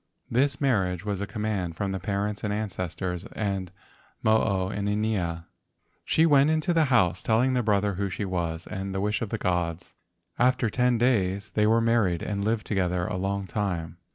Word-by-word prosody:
This 135 +3 +2
marriage 95 - +1
was 100 -2 -2
a 100 - -3
command 105 -7 -2
from 95 +4 -2
parents 100 +3 -2
and 105 - -1
ancestors 95 -3 -3
and 95 -4 -2 0.5
Mo 110 0 +5
o 95 -3 0
inanea. 100 -5 -1 0.6
She 160 - +3
went 145 -2 +5
into 160 +3 +1
the 165 -2 +4
house, 115 - +2
telling 120 +4 +2
the 125 - +2
brother 105 -2 +1
who 100 +2 -2
she 100 +3 -3
was, 85 -3 -2
and 95 0 -5
the - - 0
wish 105 +3 0
of 115 - -2
the 115 - -2
gods. 90 -3 -2 0.5
After 120 -2 +3
ten 125 -1 +2
days 100 -4 +1
they 105 0 +2
were 115 +1 +4
married 115 -7 +2
and 100 -1 -2
lived 110 +1 0
together 90 -3 0
a - - -3
long 100 +1 -2
time. 85 -3 -3
100 Hz, 180 wpm, -26 LUFS, 90-115 Hz, 0.6 s, Mo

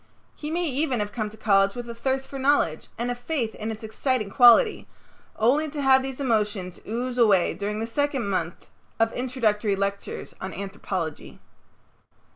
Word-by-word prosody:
He 300 - -6
may 345 +2 -1
even 270 -4 0
have 205 0 -2
come 215 -3 -3
to 215 - -14
college 195 -2 +3
with 240 -1 -6
a 235 - -5
thirst 265 +3 -2
for 275 - -7
knowledge 265 - +1
and 240 +2 -1
a - - 0
faith 245 -2 -2
in 215 +1 -5
its 220 0 -8
exciting 220 -1 -1
quality, 245 - +6 0.5
only 280 +8 +2
to 295 0 -6
have 265 -1 +5
these 265 0 -5
emotions 210 -8 -1
ooze 245 +3 -3
away 200 -6 +4
during 210 +1 -3
the 225 - -1
second 270 0 -1
month 175 -4 -3 0.3
of 225 0 +2
introductory 225 -5 0
lectures 200 +1 -4
on 190 0 -5
anthropology. 190 -5 -5
230 Hz, 170 wpm, -25 LUFS, 205-265 Hz, 0.5 s, quality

